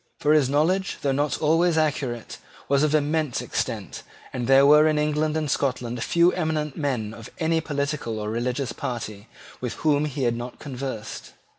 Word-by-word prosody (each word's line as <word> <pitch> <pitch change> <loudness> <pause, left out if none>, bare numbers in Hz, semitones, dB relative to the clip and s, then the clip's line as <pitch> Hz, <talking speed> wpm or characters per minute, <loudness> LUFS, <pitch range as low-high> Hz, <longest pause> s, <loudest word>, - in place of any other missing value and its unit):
For 150 +1 +3
his 145 -4 +4
knowledge, 175 +7 +1
though 140 - +2
not 145 +2 0
always 165 +2 +3
accurate, 135 -7 -1 0.3
was 140 0 +3
of 155 0 +2
immense 150 -2 0
extent - - -3 0.3
and 125 -2 -3
there 135 +1 +6
were 150 +2 +7
in 155 -1 +2
England 150 +1 +1
and 155 - -1
Scotland 125 -4 -1
few 170 +1 +4
eminent 155 -4 -2
men 125 -8 -2
of 115 -1 -10
any 165 -1 +1
political 140 -6 -2
or 105 0 -3
religious 125 +3 -2
party 110 -3 -5 0.3
with 125 -2 -3
whom 150 -1 +3
he 145 -2 -3
had 120 -1 +1
not 120 +1 -6
conversed. 130 -6 -6
145 Hz, 170 wpm, -24 LUFS, 125-155 Hz, 0.3 s, were